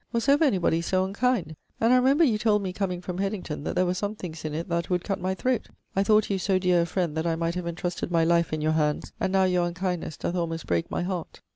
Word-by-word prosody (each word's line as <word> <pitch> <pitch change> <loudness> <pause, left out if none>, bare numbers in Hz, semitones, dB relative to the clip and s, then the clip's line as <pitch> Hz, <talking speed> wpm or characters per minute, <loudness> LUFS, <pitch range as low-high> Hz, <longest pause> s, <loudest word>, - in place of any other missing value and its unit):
Was 235 +1 -1
ever 285 +3 +5
any 255 -9 +3
body 170 -2 +1
so 185 +2 +1
unkind? 200 -5 0 0.2
And 230 +2 +4
I - - +6
remember 270 +6 +4
you 230 -8 +3
told 210 -2 +2
me 185 -1 -3
comeing 180 -2 -2
from 180 0 -5
Hedington 195 -7 -3
that - - -2
there 185 - +3
were 180 - +1
some 205 +3 -3
things 165 -6 -7
in 155 -1 -3
it 165 +2 -3
that 170 -1 -1
"would 180 -1 0
cutt 195 -2 -3
my 185 +1 -1
throat." 250 +4 -1 0.3
I 195 - +3
thought 215 +1 +3
you 195 - 0
so 190 +1 +2
deare 180 -2 +3
a - - +1
friend 170 -3 -1
that 160 +1 -1
I 165 - +1
might 165 +1 -1
have 180 -1 -4
entrusted 175 +1 -3
my 165 -2 +2
life 170 0 +2
in 155 -1 -2
your 155 +1 +2
hands 150 -1 0
and 190 - 0
now 190 0 +3
your 180 -2 +2
unkindnes 180 -3 -3
doth - - -3
almost 165 -2 -2
break 85 -1 0
my - - -2
heart.' 180 -2 -5
180 Hz, 275 wpm, -26 LUFS, 170-200 Hz, 0.3 s, I